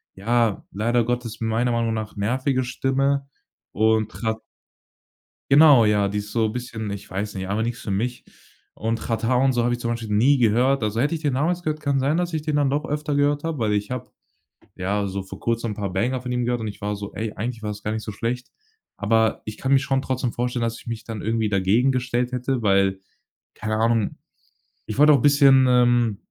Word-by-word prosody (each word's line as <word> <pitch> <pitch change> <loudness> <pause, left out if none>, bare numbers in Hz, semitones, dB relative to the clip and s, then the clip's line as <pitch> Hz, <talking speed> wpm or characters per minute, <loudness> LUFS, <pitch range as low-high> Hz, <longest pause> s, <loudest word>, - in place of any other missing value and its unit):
ja, 115 +1 0
leider 115 +4 +1
Gottes 120 -1 -3
meiner 115 +2 0
Meinung 115 -1 0
nach 110 -1 -5
nervige 130 +5 0
Stimme 135 +2 0 0.4
und 110 0 +2
hat 110 0 0 1.1
Genau, 140 -5 +7
ja, 105 -1 +2
die 105 +1 -2
ist 105 0 -7
so 110 -2 +1
bisschen, 115 -2 -5
ich 100 - -7
weiß 100 +2 -4
nicht, 95 0 -4
einfach 105 +3 -1
nix 120 0 -3
für 100 - -4
mich. 120 +5 -2 0.5
Und 115 +1 -2
„Xatar“ 115 +2 0
und 135 - +4
so 120 -1 +1
habe 120 +1 +1
ich 120 - -3
zum 120 -1 -2
Beispiel 115 -2 -4
nie 135 +7 +4
gehört. 125 +3 +3
Also 105 +2 -1
hätte 145 +6 +1
ich 160 - -6
den 145 -4 0
damals 170 +5 0
gehört, 155 -1 -2
kann 140 -2 +1
sein, 145 +5 +1
dass 175 -1 -1
ich 155 - -1
den 155 -1 -2
dann 145 -2 +2
doch 145 +2 -1
öfter 150 +1 -2
gehört 145 +1 +1
habe, 165 -5 -3
weil 105 -2 +1
ich 105 +3 -2
habe, 125 - -5 0.7
ja, 100 +2 -1
so 95 0 -4
vor 95 - -10
Kurzem 115 -1 -1
'n - - -3
paar 100 -3 -3
Banger 125 +7 -1
von 125 -1 -5
ihm 125 -1 0
gehört 120 -1 -1
und 110 - -3
ich 105 - -8
war 105 0 -2
so: 100 0 -7
„Ey, 110 +1 -4
eigentlich 115 +1 -4
war 105 - -2
das 105 0 -9
gar 105 - -2
nicht 110 0 -3
so 105 - -5
schlecht.“ 120 +4 -3 0.5
Aber 110 +1 +1
ich 110 - -7
kann 135 +1 0
mir 135 - +6
schon 135 0 0
trotzdem 130 -2 -2
vorstellen, 120 0 -2
dass 115 0 -2
ich - - -18
mich 115 -1 -5
dann 110 -3 -6
irgendwie 110 -1 0
dagegen 105 +7 +2
gestellt 125 -1 -1
hätte, 125 0 -1
weil, 95 -2 +2 0.6
keine 110 0 -3
Ahnung. 115 -1 +1 0.7
Ich 110 - -6
wollte 150 +1 +7
auch 135 - +3
bisschen, 140 -2 +6
ähm 120 -4 +3
115 Hz, 220 wpm, -23 LUFS, 110-130 Hz, 1.1 s, Genau